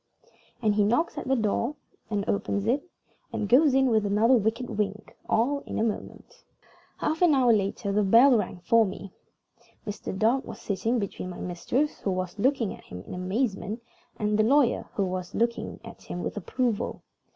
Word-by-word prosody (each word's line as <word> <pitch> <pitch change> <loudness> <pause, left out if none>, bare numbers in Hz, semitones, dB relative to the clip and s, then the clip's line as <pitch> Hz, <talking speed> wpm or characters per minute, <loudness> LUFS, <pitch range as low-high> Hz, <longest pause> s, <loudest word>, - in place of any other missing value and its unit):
And 215 -1 +3
he 205 0 +3
knocks 245 +13 +1
at - - -7
the 265 - +3
door, 235 +4 0 0.3
and 205 -2 -2
opens 200 0 -1
it, 275 +9 0 0.4
and 205 - -2
goes 265 +5 +5
in 270 0 +4
with 220 -2 +3
another 210 +5 +3
wicked 230 +2 +1
wink, 210 -1 -3
all 270 +6 +2
in - - -4
a - - +1
moment. 220 -2 -5 0.5
Half 315 +2 -1
an 340 -5 +5
hour 250 -3 +5
later 200 0 -1
the 210 +1 +2
bell 235 +7 +6
rang 190 -4 -2
for 230 -1 +5
me. 195 -1 -6 0.7
Mr. 205 -2 -5
Dark 235 +6 +2
was - - -9
sitting 220 +4 -1
between 200 -3 -4
my 180 - -8
mistress 240 - -1
(who - - -2
was 185 +1 -3
looking 250 -3 +1
at - - -14
him 90 0 -9
in - - -8
amazement) 205 +3 -2 0.3
and 210 0 0
the - - +5
lawyer 265 +2 +3
(who 200 - +1
was 185 -1 -4
looking 235 0 -1
at 230 - -11
him 175 - -6
with - - -4
approval). 230 +2 -2
220 Hz, 185 wpm, -27 LUFS, 200-250 Hz, 0.7 s, bell